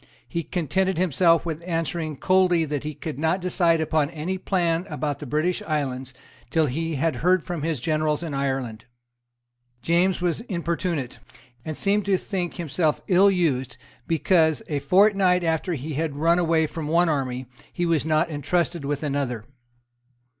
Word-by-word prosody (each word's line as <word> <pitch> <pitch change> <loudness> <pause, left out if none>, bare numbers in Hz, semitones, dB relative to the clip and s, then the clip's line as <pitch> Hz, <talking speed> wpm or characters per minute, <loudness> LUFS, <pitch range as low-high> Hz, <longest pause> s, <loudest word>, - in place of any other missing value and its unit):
He 170 - -2
contented 185 +3 -1
himself 170 -1 +3
with 160 -1 -4
answering 165 -3 -2
coldly 185 -2 +3
that 145 -2 -3
he 150 -1 -5
could 150 -2 -6
not 160 +4 +1
decide 175 -2 +2
upon 155 -2 +1
any 170 +4 -4
plan 175 -1 0
about 150 -2 -3
the 150 - -7
British 155 +7 0
islands 135 -4 -2 0.4
till 160 -1 +2
he 160 +4 -2
had 145 -1 0
heard 180 +4 +2
from 175 -3 -4
his 160 -2 -1
generals 155 +3 0
in 160 -4 -4
Ireland. 130 -5 -2 1.0
James 175 +3 +2
was 175 +2 -1
importunate, 170 - -2 0.4
and 155 -1 -5
seemed 205 0 +1
to 195 -2 +3
think 180 -2 -4
himself 160 -2 -1
ill 190 +2 +6
used, 140 -10 0 0.3
because, 160 -2 +2
a 145 -2 -1
fortnight 190 +1 +4
after 165 +2 0
he 150 +3 -5
had 155 0 -2
run 165 +4 +3
away 165 -2 +2
from 155 0 -5
one 170 +3 +3
army, 130 -4 -1 0.3
he 175 - -2
was 165 -3 +2
not 155 +2 +2
entrusted 165 +3 -1
with 145 +1 -2
another. 135 -6 -2
165 Hz, 160 wpm, -24 LUFS, 150-175 Hz, 1.0 s, ill